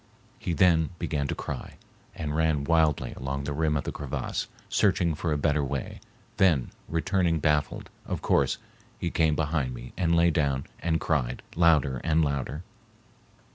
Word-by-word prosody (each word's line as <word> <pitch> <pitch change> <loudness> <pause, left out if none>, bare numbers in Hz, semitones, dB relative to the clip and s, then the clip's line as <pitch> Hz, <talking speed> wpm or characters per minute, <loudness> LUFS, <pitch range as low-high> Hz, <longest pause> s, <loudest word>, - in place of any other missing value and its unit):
He 85 - -2
then 80 -3 +4
began 70 -4 -1
to - - -2
cry - - -6 0.4
and 75 -1 -3
ran 80 -2 +2
wildly 80 -5 +2
along 70 +1 -3
the 70 - -3
rim 75 0 +1
of 70 - -2
the - - -3
crevasse, 70 -3 -3 0.2
searching 85 -2 +2
for 80 +2 -2
a 75 - +1
better 75 0 +1
way, 70 -1 -4 0.4
then, 80 -10 +3 0.2
returning 85 +1 +1
baffled, 75 -1 0 0.2
of - - -2
course, - - +2 0.4
he 85 - -2
came 80 -2 +2
behind 75 -5 -1
me - - -9
and 85 -2 +2
lay 85 0 +5
down 70 -4 0
and 80 -1 0
cried 65 -6 -1
louder 75 -7 +3
and 80 -1 +3
louder. 70 +3 -3
75 Hz, 160 wpm, -27 LUFS, 70-80 Hz, 0.4 s, lay